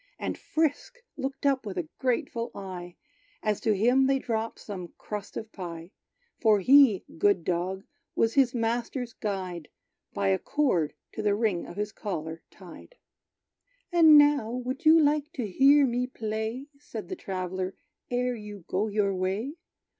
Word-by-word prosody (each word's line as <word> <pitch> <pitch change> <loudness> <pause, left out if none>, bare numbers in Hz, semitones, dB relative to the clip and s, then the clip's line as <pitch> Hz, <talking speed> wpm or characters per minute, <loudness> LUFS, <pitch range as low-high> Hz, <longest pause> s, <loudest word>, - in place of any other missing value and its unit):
And - - -3
Frisk 315 - -1 0.2
looked 270 +1 -5
up 275 -2 +2
with 200 -4 -6
a 170 -3 -2
grateful 250 -2 -1
eye, 180 -3 -7 0.5
As 215 -2 0
to 215 -2 +1
him 250 +6 +4
they 270 0 +3
dropped 225 -3 -3
some 185 -5 -8
crust 210 -2 -6
of 220 0 -6
pie: 170 -2 -7 0.5
For 215 -3 +4
he, 255 -2 +6
good 200 -3 +3
dog, 185 +3 -2 0.3
was 225 0 +2
his 260 -3 +3
master's 235 +1 -2
guide, 185 -6 -4 0.4
By 95 - 0
a 95 - +2
cord 190 - 0 0.2
to - - -5
the 205 -1 +2
ring 205 -5 0
of - - -9
his 210 0 -2
collar 165 -6 -5
tied. 185 - -14 1.0
"And 320 -3 +8
now, 290 -6 +5
would 255 +6 -3
you 320 +1 +8
like 300 -1 +2
to 250 - -3
hear 275 +8 +5
me 250 0 0
play," 220 +2 -4
Said 220 -9 -8
the 185 - -3
traveller, 185 0 -4 0.3
"ere 250 0 0
you 210 -5 -9
go 200 +4 0
your 205 -2 +1
way? 190 +9 -2
220 Hz, 155 wpm, -28 LUFS, 190-260 Hz, 1.0 s, And